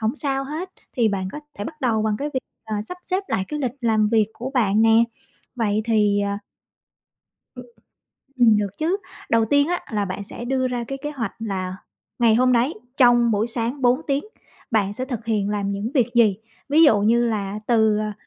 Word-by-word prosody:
hổng 220 Hz, +3 st, 0 dB
sao 275 Hz, -2 st, -1 dB
hết, 320 Hz, +7 st, -5 dB, 0.3 s
thì 230 Hz, -3 st, +3 dB
bạn 190 Hz, -2 st, -2 dB
có 300 Hz, -, -6 dB, 0.2 s
thể 205 Hz, -, -3 dB
bắt 305 Hz, +3 st, -8 dB
đầu 225 Hz, -4 st, +1 dB
bằng 215 Hz, -1 st, 0 dB
cái 290 Hz, -, -2 dB
việc, 260 Hz, -, +1 dB, 0.2 s
ờ, 215 Hz, -, -4 dB
sắp 360 Hz, +9 st, -7 dB
xếp 370 Hz, +2 st, -1 dB
lại 190 Hz, -, 0 dB
cái 300 Hz, -1 st, -3 dB
lịch 255 Hz, -4 st, -1 dB
làm 220 Hz, -2 st, +2 dB
việc 220 Hz, -2 st, +3 dB
của 255 Hz, +3 st, -5 dB
bạn 215 Hz, -4 st, +3 dB
nè. 225 Hz, +1 st, +5 dB, 0.5 s
Vậy 215 Hz, -2 st, 0 dB
thì, 210 Hz, -3 st, +3 dB
à 200 Hz, 0 st, -1 dB, 1.2 s
Ừm. -, -, -10 dB, 0.7 s
Ừm, 230 Hz, -4 st, +5 dB
được 200 Hz, -1 st, -3 dB
chứ, 340 Hz, +5 st, 0 dB, 0.3 s
đầu 230 Hz, -1 st, +3 dB
tiên 285 Hz, +5 st, +3 dB
á, 355 Hz, 0 st, 0 dB
là 205 Hz, -2 st, 0 dB
bạn 190 Hz, +2 st, -5 dB
sẽ 235 Hz, +4 st, -8 dB
đưa 260 Hz, 0 st, 0 dB
ra 245 Hz, -1 st, -2 dB
cái 275 Hz, -, -4 dB
kế 295 Hz, -, -4 dB
hoạch 230 Hz, -8 st, -3 dB
là 190 Hz, -4 st, -3 dB, 0.4 s
ngày 230 Hz, -2 st, +5 dB
hôm 255 Hz, +2 st, +4 dB
đấy 245 Hz, +6 st, +2 dB, 0.2 s
trong 240 Hz, -2 st, +5 dB
buổi 215 Hz, +2 st, +1 dB
sáng 235 Hz, +4 st, -3 dB
4 250 Hz, +4 st, +3 dB
tiếng 280 Hz, +1 st, 0 dB, 0.5 s
bạn 205 Hz, -3 st, +1 dB
sẽ 255 Hz, +4 st, -4 dB
thực 240 Hz, -4 st, -5 dB
hiện 210 Hz, -3 st, 0 dB
làm 200 Hz, -1 st, -1 dB
những 200 Hz, +4 st, -3 dB
việc 250 Hz, -5 st, +3 dB
gì. 220 Hz, -5 st, +4 dB, 0.3 s
Ví 310 Hz, +3 st, +6 dB
dụ 225 Hz, -10 st, +6 dB
như 235 Hz, +3 st, +3 dB
là 210 Hz, -2 st, -2 dB
từ, 220 Hz, -3 st, +3 dB
à, 215 Hz, 0 st, -2 dB
230 Hz, 210 wpm, -22 LUFS, 210-260 Hz, 1.2 s, Ví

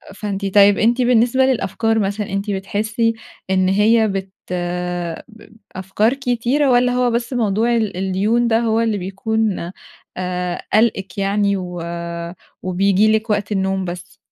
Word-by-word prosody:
فأنتِ 200 Hz, -2 st, -4 dB
طيب 200 Hz, 0 st, +6 dB
أنتِ 235 Hz, +3 st, +2 dB
بالنسبة 245 Hz, +1 st, +3 dB
للأفكار 225 Hz, -3 st, 0 dB
مثلًا، 200 Hz, 0 st, -2 dB
أنتِ 200 Hz, +1 st, -2 dB
بتحسي 215 Hz, +4 st, -1 dB, 0.4 s
إن 185 Hz, -1 st, +2 dB
هي 220 Hz, +3 st, +3 dB
بت 195 Hz, -1 st, -4 dB, 1.0 s
ب 220 Hz, -2 st, -17 dB, 0.3 s
أفكار 195 Hz, +5 st, 0 dB
كتيرة 270 Hz, +1 st, 0 dB
والّا 245 Hz, 0 st, +3 dB
هو 250 Hz, 0 st, +1 dB
بس 235 Hz, +2 st, -2 dB
موضوع 230 Hz, 0 st, +1 dB
ال 215 Hz, -5 st, -1 dB
الديون 200 Hz, +6 st, +1 dB
ده 225 Hz, 0 st, +3 dB
هو 225 Hz, -1 st, +1 dB
اللي 225 Hz, -2 st, 0 dB
بيكون 195 Hz, -1 st, -2 dB, 0.5 s
آآ 180 Hz, -1 st, -3 dB
قالقِك 210 Hz, -4 st, +1 dB
يعني 200 Hz, 0 st, +1 dB
و 180 Hz, -2 st, -6 dB, 0.8 s
وبييجي 195 Hz, +3 st, +2 dB
لِك 220 Hz, +1 st, 0 dB
وقت 210 Hz, 0 st, -1 dB
النوم 190 Hz, -1 st, 0 dB
بس؟ 180 Hz, +3 st, -8 dB
210 Hz, 140 wpm, -19 LUFS, 195-230 Hz, 1.0 s, طيب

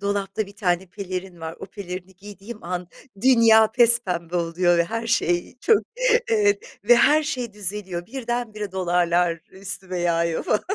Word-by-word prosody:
dolapta 200 Hz, +1 st, -2 dB
bir 200 Hz, +1 st, -15 dB
tane 180 Hz, -2 st, 0 dB
pelerin 185 Hz, -2 st, -7 dB
var, 160 Hz, 0 st, -6 dB
o -, -, -7 dB
pelerini 190 Hz, -2 st, -8 dB
giydiğim 205 Hz, +2 st, -11 dB
an 180 Hz, 0 st, -4 dB, 0.3 s
dünya 230 Hz, -4 st, +6 dB
pespembe 195 Hz, -9 st, +3 dB
oluyor 175 Hz, +1 st, +1 dB
ve 170 Hz, -, +3 dB
her 230 Hz, +6 st, -4 dB
şey 175 Hz, -5 st, 0 dB
çok 445 Hz, -3 st, +3 dB, 0.5 s
evet, 420 Hz, +1 st, +1 dB
ve 240 Hz, -, +6 dB
her 300 Hz, +5 st, +5 dB
şey 250 Hz, -6 st, -4 dB
düzeliyor, 190 Hz, -3 st, -5 dB
birdenbire 230 Hz, -4 st, -4 dB
dolarlar 175 Hz, -2 st, +1 dB
üstüme 190 Hz, -1 st, -4 dB
yağıyor 170 Hz, -1 st, 0 dB
falan. 210 Hz, -, +1 dB
195 Hz, 145 wpm, -23 LUFS, 175-230 Hz, 0.5 s, dünya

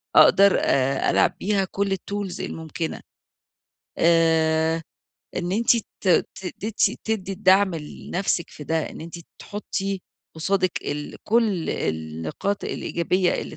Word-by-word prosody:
أقدر 200 Hz, 0 st, +7 dB, 0.5 s
ألعب -, -, +3 dB
بيها 200 Hz, -1 st, +1 dB
كل 200 Hz, 0 st, 0 dB
الtools 200 Hz, -1 st, -5 dB
الممكنة. 160 Hz, 0 st, -4 dB, 1.0 s
آآ، 160 Hz, -1 st, +3 dB, 0.5 s
إن 180 Hz, 0 st, -2 dB
أنتِ 230 Hz, +3 st, +4 dB
ت 215 Hz, -3 st, -5 dB, 0.3 s
ت 190 Hz, -, -8 dB
تدي 215 Hz, +1 st, +1 dB
تدي 205 Hz, -4 st, -2 dB
الدعم 190 Hz, -1 st, +4 dB
لنفسِك 170 Hz, +3 st, -3 dB
في 150 Hz, -, -10 dB
ده 160 Hz, +1 st, -1 dB
إن -, -, -10 dB
أنتِ 165 Hz, +1 st, -9 dB, 0.3 s
تحطّي 195 Hz, -2 st, -4 dB, 0.3 s
قصادِك 185 Hz, +2 st, +1 dB
ال 145 Hz, 0 st, -4 dB
كل 215 Hz, -7 st, +2 dB
النقاط 80 Hz, -, -3 dB
الإيجابية 180 Hz, +2 st, 0 dB
اللي -, -, -5 dB
185 Hz, 115 wpm, -24 LUFS, 160-200 Hz, 1.0 s, أقدر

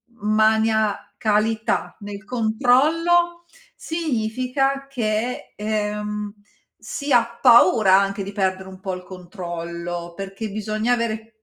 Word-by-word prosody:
maniacalità 220 Hz, 0 st, +1 dB
nel 205 Hz, 0 st, -8 dB
controllo 305 Hz, +10 st, +2 dB, 0.3 s
significa 270 Hz, -2 st, -1 dB
che, 235 Hz, -2 st, -2 dB
ehm, 210 Hz, -1 st, -3 dB, 0.4 s
si 285 Hz, -1 st, -5 dB
ha 235 Hz, -1 st, +2 dB
paura 230 Hz, -5 st, +6 dB
anche 195 Hz, 0 st, -1 dB
di 200 Hz, -, -6 dB
perdere 190 Hz, -1 st, -1 dB
un 190 Hz, 0 st, -11 dB
po' 190 Hz, 0 st, -4 dB
il 180 Hz, -, -7 dB
controllo, 175 Hz, -2 st, -6 dB
perché 195 Hz, +3 st, -6 dB
bisogna 215 Hz, +3 st, -1 dB
avere 225 Hz, -2 st, -2 dB
215 Hz, 100 wpm, -22 LUFS, 200-245 Hz, 0.4 s, paura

